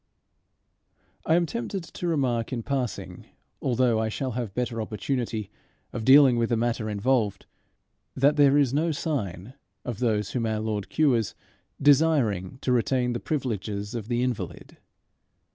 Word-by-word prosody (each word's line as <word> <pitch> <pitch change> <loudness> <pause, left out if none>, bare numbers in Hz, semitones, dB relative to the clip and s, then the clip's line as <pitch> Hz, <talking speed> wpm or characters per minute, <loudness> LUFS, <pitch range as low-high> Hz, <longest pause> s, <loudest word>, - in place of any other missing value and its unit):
I 160 - +4
am 175 0 +3
tempted 160 +6 -4
to 175 +1 -6
remark 130 -8 0
in 120 -3 -3
passing, 130 -3 -4 0.3
although 125 -3 +2
I 110 0 0
shall 130 +4 -3
have 115 -4 -4
better 120 -2 -2
opportunity 110 -1 -3 0.4
of 110 - -4
dealing 135 -2 +7
with 115 - +1
the 120 - +1
matter 115 -1 -1
involved, 105 0 0 0.7
that 140 +3 +3
there 145 -1 +5
is 135 -3 +3
no 160 +3 +1
sign 125 - -3 0.3
of 120 -4 -4
those 110 -5 0
whom 115 -3 -1
our 110 -1 -1
Lord 105 -2 -3
cures 125 -9 +1 0.4
desiring 135 - +3
to 130 - +1
retain 125 0 +1
the 120 - -3
privileges 105 - -3
of 115 -3 -5
the 120 0 0
invalid. 125 -3 -4
120 Hz, 145 wpm, -26 LUFS, 110-135 Hz, 0.7 s, dealing